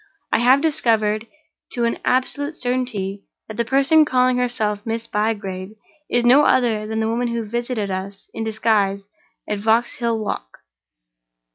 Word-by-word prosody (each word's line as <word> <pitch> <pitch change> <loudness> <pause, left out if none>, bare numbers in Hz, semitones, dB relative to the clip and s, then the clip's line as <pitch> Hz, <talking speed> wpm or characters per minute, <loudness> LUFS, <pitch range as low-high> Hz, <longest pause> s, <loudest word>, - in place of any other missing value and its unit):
I - - +4
have 255 +4 +5
discovered, 225 -8 +1 0.5
to 240 -1 0
an 230 - -1
absolute 285 +4 0
certainty, 245 -6 -2 0.3
that 220 - -8
the 235 - +2
person 275 +6 +4
calling 255 -3 +2
herself 215 -4 -1
Miss 225 0 -3
Bygrave 210 -3 -3 0.3
is 240 0 +1
no 265 +5 +7
other 220 -4 +2
than 220 0 -2
the 220 - 0
woman 235 +2 0
who 235 -1 -2
visited 235 -2 -3
us 195 +1 -6
in 225 - -4
disguise 210 -3 0 0.4
at 210 -1 -2
Vauxhall 230 +2 +1
Walk. 205 - -5
225 Hz, 145 wpm, -21 LUFS, 210-245 Hz, 0.5 s, no